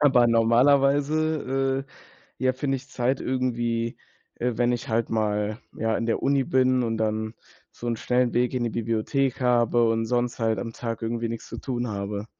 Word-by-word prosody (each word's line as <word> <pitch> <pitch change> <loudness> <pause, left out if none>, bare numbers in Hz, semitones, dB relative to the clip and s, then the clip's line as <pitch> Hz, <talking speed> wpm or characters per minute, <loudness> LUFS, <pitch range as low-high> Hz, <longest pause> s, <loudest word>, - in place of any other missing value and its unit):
aber 130 -5 +5
normalerweise, 135 +3 +2 0.5
äh, - - -4
ja 130 - +4
finde 135 +1 -1
ich 135 +2 -11
Zeit 130 +1 0
irgendwie, 120 -2 -1 0.4
äh, 125 +1 -1
wenn 120 0 +2
ich 120 -1 -4
halt 115 0 0
mal, 105 -1 -1 0.2
ja, 110 0 +1
in - - -2
der 115 - 0
Uni 140 -1 +3
bin 130 0 +2
und 115 -2 -1
dann 110 0 -1 0.4
so 120 - -9
'n 115 -1 0
schnellen 125 +1 +1
Weg 125 +1 +1
in 125 -2 0
die 120 - -1
Bibliothek 115 +4 -1
habe 120 -1 +3
und 115 0 +1
sonst 120 +1 0
halt 110 -2 +1
am 115 +4 -4
Tag 115 -1 -5
irgendwie 115 0 -2
nix 115 -1 -6
zu - - -7
tun 125 -2 -3
habe. 100 0 -4
120 Hz, 185 wpm, -25 LUFS, 115-130 Hz, 0.5 s, aber